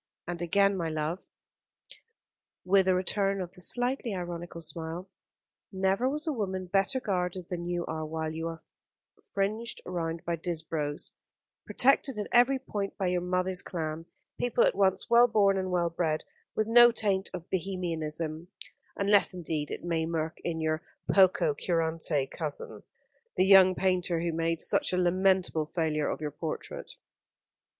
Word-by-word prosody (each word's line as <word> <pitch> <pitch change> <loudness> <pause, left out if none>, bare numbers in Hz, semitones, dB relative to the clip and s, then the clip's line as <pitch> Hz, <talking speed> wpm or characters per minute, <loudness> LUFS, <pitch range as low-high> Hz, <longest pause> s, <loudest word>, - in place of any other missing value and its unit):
And 175 0 -4
again, 195 +3 +3
my 170 -3 -2
love," 155 +3 -2 1.5
with 190 0 +4
a 185 - +4
return 195 +1 0
of 180 -2 -4
the 180 - -13
slightly 245 +1 -1
ironical 175 -1 -6
smile, 165 +3 -5 0.6
"never 195 +6 +1
was 300 +2 -1
a 315 - 0
woman 190 -6 -3
better 195 +8 +1
guarded 180 -5 -2
than 175 -1 -4
you 175 -1 -2
are 155 0 -4
while 160 0 -3
you 165 +1 -3
are 165 0 -7 0.7
fringed 215 +4 -1
round 165 -2 -3
by 170 0 -1
Disbrowes, 160 -3 -3 0.5
protected 270 -1 +3
at 210 - -2
every 245 +3 +5
point 205 -6 -4
by 190 -2 0
your 180 0 0
mother's 180 +1 0
clan, 165 -2 -5 0.3
people 245 -1 +2
at - - +3
once 190 -1 +1
well 235 +1 +6
born 205 -4 +3
and 190 -1 -2
well 175 -2 +1
bred, 160 -2 -1 0.3
with 215 - +1
no 240 +2 +7
taint 200 -4 0
of 180 -1 -7
Bohemianism, 165 -3 -3 0.5
unless 200 -1 +3
indeed 160 -4 -3
it - - -6
may 165 -2 -1
lurk 160 0 -3
in 165 -2 -2
your 155 0 0 0.3
poco 185 -6 +4
curante 160 -2 0
cousin, 155 -3 -4 0.6
the 185 - +4
young 190 -1 +7
painter 180 -2 +1
who 170 -1 -1
made 165 0 0
such - - +1
a - - +2
lamentable 180 -3 +2
failure 155 -3 0
of - - -4
your 150 -1 -3
portrait." 155 +2 -6
180 Hz, 155 wpm, -29 LUFS, 165-195 Hz, 1.5 s, no